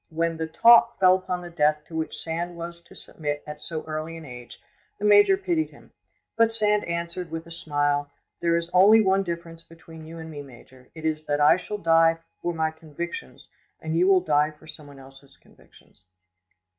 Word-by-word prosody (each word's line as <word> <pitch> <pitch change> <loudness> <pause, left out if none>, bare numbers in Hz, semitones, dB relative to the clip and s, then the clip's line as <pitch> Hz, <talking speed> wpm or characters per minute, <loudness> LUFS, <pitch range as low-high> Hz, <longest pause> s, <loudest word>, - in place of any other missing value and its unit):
When 165 +1 -1
the 160 0 -3
talk 235 +7 +5
fell 185 -1 +6
upon 185 -1 -2
the 175 - -9
death 150 -2 +1
to 160 - -11
which 160 -1 -3
Sand 170 +1 -4
was 170 0 -7
to - - -17
submit 145 -2 -5
at 150 0 -9
so 160 -2 -5
early 155 +1 -5
an 165 - -11
age, 125 -3 -11 0.4
the 205 - -4
major 210 - +6
pitied 345 -5 -1
him; - - -19 0.4
but 230 0 +3
Sand 210 -2 +1
answered, 170 +1 -4
with 165 +1 -6
a 170 - -14
smile, 145 -3 -1 0.3
"There 170 0 +1
is 170 0 -4
only 200 +5 +7
one 195 -2 +3
difference 170 -2 -6
between 165 -1 -14
you 165 +1 -10
and 160 0 -9
me, 145 -2 -7
major; 130 -1 -16
it 160 -1 -9
is 155 -1 -2
that 145 0 0
I 150 +2 +6
shall 210 +3 -6
die 165 -2 +3 0.2
far 175 - -2
my 160 -1 -1
convictions, 160 - -8 0.3
and 160 0 -4
you 175 +3 +3
will 190 -2 +5
die 150 -3 +2
for 155 0 -18
someone 150 -3 -12
else's 135 +1 -15
convictions." - - -23
165 Hz, 195 wpm, -25 LUFS, 155-175 Hz, 0.4 s, only